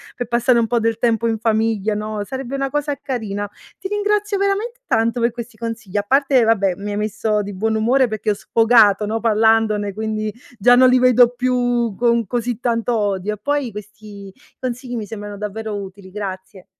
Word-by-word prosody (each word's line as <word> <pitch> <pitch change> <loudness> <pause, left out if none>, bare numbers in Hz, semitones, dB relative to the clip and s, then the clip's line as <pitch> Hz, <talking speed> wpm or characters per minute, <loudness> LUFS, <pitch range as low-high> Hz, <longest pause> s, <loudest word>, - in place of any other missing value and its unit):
pe 245 - -3
passare 240 +1 +2
un 230 - +1
po' 235 +1 +1
del 225 0 0
tempo 230 -1 +1
in 225 -1 0
famiglia, 220 -1 0
no, 210 0 -4
sarebbe 265 +3 -5
una 275 0 -1
cosa 290 0 -1
carina. 205 -6 -4 0.3
Ti 385 - -6
ringrazio 415 0 0
veramente 400 +5 -1
tanto 230 +2 +1
per 235 +1 +2
questi 235 -1 -9
consigli, 220 -4 -5
a 205 - +1
parte, 270 -2 +3
vabbè, 200 -5 +2
mi 205 +1 -5
hai 205 - -3
messo 215 0 -1
di 205 0 -6
buon 220 +4 -1
umore 245 +4 +3
perché 215 -1 -3
ho - - +3
sfogato, 220 -2 +4
no, 220 +2 -2
parlandone. 220 -2 +2
Quindi, 215 0 -3 0.2
già 245 +4 +5
non 255 +1 +6
li 255 0 +4
vedo 245 -1 +5
più 245 -3 0
con 235 -1 +2
così 240 +2 -2
tanto 235 0 0
odio 205 -1 -1
e - - -7
poi 285 +4 -1
questi 210 -1 -11 0.3
consigli 250 0 -4
mi 220 -3 -4
sembrano 205 -1 -7
davvero 210 +1 -5
utili, 195 -1 -8
grazie. 190 -1 -7
225 Hz, 190 wpm, -20 LUFS, 210-245 Hz, 0.3 s, non